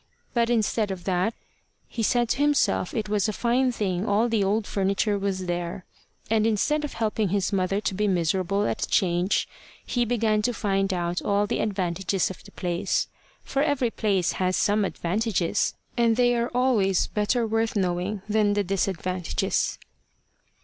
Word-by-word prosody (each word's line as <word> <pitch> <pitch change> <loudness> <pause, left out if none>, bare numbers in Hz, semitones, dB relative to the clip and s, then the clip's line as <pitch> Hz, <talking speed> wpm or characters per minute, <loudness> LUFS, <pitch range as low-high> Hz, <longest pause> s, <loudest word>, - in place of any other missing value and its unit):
But 235 -2 +2
instead 220 -2 +1
of 190 -2 -5
that, 185 +4 0 0.5
he 235 - -5
said 240 +2 +2
to 270 - 0
himself 290 0 +2
it 220 -2 -1
was 210 0 +1
a - - +1
fine 250 +4 +1
thing 190 -5 -1
all 220 +3 +2
the 220 -3 +2
old 205 +2 +1
furniture 200 +2 0
was 195 -2 -2
there. 175 +1 -3 0.4
And 220 0 +2
instead 295 +8 +1
of 295 - -4
helping 220 -2 0
his 200 +1 0
mother 195 +1 +1
to 205 - -1
be 210 +2 0
miserable 190 +2 +1
at - - -1
the - - -1
change, 180 -1 +1 0.4
he 245 - 0
began 225 -2 +1
to 245 +2 -1
find 195 -1 0
out 175 -1 -1
all 205 0 +1
the - - -2
advantages 190 -2 -1
of 185 - -11
the - - -14
place; 180 +2 -1 0.3
for 275 - -1
every 280 -5 +1
place 195 -6 +1
has 185 0 0
some 205 0 +2
advantages, 190 0 0 0.2
and 235 -2 +3
they 245 0 +3
are 235 0 0
always 240 -7 +2
better 220 +3 0
worth 225 +1 0
knowing 185 +1 -1
than 210 -1 +2
the 205 0 +1
disadvantages. 185 -2 -1
205 Hz, 170 wpm, -25 LUFS, 190-225 Hz, 0.5 s, and